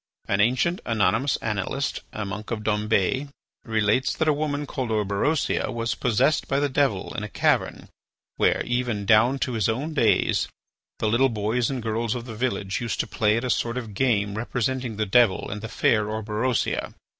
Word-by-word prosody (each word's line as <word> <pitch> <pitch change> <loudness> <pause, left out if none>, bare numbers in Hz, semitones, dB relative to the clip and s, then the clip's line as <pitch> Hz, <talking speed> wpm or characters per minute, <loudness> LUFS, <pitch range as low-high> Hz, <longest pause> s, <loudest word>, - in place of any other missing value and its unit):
An 100 +1 +2
ancient 130 - +2
anonymous 115 +4 +1
annalist, 110 +6 -2
a 105 - -4
monk 105 +2 -6
of 110 -2 -3
Dombes, 105 +5 +1 0.3
relates 110 +3 +1
that 160 - 0
a 155 - +5
woman 145 0 -2
called 130 -4 -4
Orberosia 110 +8 0
was 115 -1 -1
possessed 130 +6 +1
by 135 - +1
the 145 - +2
devil 130 -8 0
in - - -4
a - - -5
cavern - - 0 0.5
where, - - +2
even 120 -4 -1
down 110 +6 +4
to 125 - -4
his 110 -2 +1
own 140 +8 -2
days, 150 - +2 0.5
the 110 - -1
little 125 +5 +3
boys 110 +2 0
and 130 -4 -3
girls 115 +1 -1
of 120 -1 -5
the 115 - -7
village 110 -4 -2
used 120 -2 -3
to - - -4
play 105 0 +1
at 115 - -2
a 125 - +1
sort 115 +1 -1
of 115 -5 -5
game 105 -3 +1
representing 125 +1 -2
the 110 - 0
devil 110 -1 +3
and 105 +1 -5
the 115 - -6
fair 105 0 +2
Orberosia. 110 +3 -1
115 Hz, 180 wpm, -25 LUFS, 105-130 Hz, 0.5 s, a